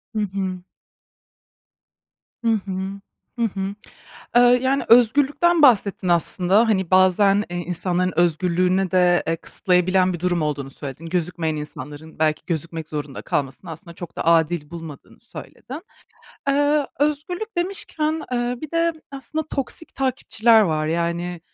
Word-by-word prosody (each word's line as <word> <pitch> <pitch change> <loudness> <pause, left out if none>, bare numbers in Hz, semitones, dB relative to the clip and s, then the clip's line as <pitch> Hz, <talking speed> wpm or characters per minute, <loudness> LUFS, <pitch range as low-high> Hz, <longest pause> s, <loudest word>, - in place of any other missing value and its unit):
Hı 215 - 0
hı. 190 -2 -3 1.8
Hı 230 - -1 0.2
hı. 195 - -5 0.7
Hı 235 - +2
hı. 195 -1 -3 0.6
Eee, 245 - +8 0.2
yani, 270 +1 +1
özgürlükten 285 +8 +4
bahsettin 200 -7 +4
aslında, 180 +5 +3
hani, 190 -5 0
bazen, 195 +2 +4
eee, 175 - -4
insanların 180 +1 -1
özgürlüğüne 180 +2 +1
de, 180 -1 +3
eee, 165 0 0
kısıtlayabilen 185 +1 +1
bir 170 - -6
durum 175 -2 0
olduğunu 145 -3 -3
söyledin, 140 +3 -8
gözükmeyen 165 -2 -2
insanların 150 +1 -9
belki 155 -1 +1
gözükmek 165 -1 -4
zorunda 145 -3 -6
kalmasını 140 +3 -3
aslında 170 +2 -10
çok 175 -1 -9
da - - -3
adil 165 -2 +2
bulmadığını 165 -4 -10
söyledin. 295 +6 -10 0.7
Eee, 290 +1 +2
özgürlük 345 +9 -2
demişken, 325 -4 -1
eee, 245 0 -1
bir 310 - -7
de 335 0 +1 0.2
aslında 290 +3 -4
toksik 275 +4 -4
takipçiler 235 -4 +3
var. 155 -4 0
Yani, 170 +1 -2
185 Hz, 130 wpm, -22 LUFS, 165-245 Hz, 1.8 s, Eee